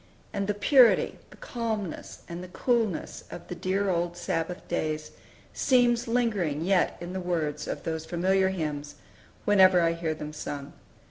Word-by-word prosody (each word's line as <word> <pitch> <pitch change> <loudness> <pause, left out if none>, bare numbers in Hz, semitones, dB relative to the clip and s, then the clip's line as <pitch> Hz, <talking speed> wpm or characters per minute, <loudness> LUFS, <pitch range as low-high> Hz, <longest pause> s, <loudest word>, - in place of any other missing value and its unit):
And 200 -1 -1
the 205 - 0
purity, 240 +4 +5
the - - -15
calmness, 220 -7 -4
and 170 +1 -6
the - - -8
coolness 225 -1 -1
of 175 - -9
the - - -3
dear 190 +3 0
old 175 0 -1
Sabbath 175 +1 -3
days 155 -2 -2 0.4
seems 245 -3 +3
lingering 205 -11 0
yet 190 -1 +2
in 175 +1 -6
the 190 - -3
words 155 -4 -2
of - - -4
those 160 -1 -3
familiar 190 +2 +2
hymns, 150 -5 -4 0.5
whenever 190 -3 +6
I 165 -1 +3
bear 165 -2 -2
them 150 0 -7
sung. 145 -1 -6
180 Hz, 155 wpm, -28 LUFS, 160-200 Hz, 0.5 s, whenever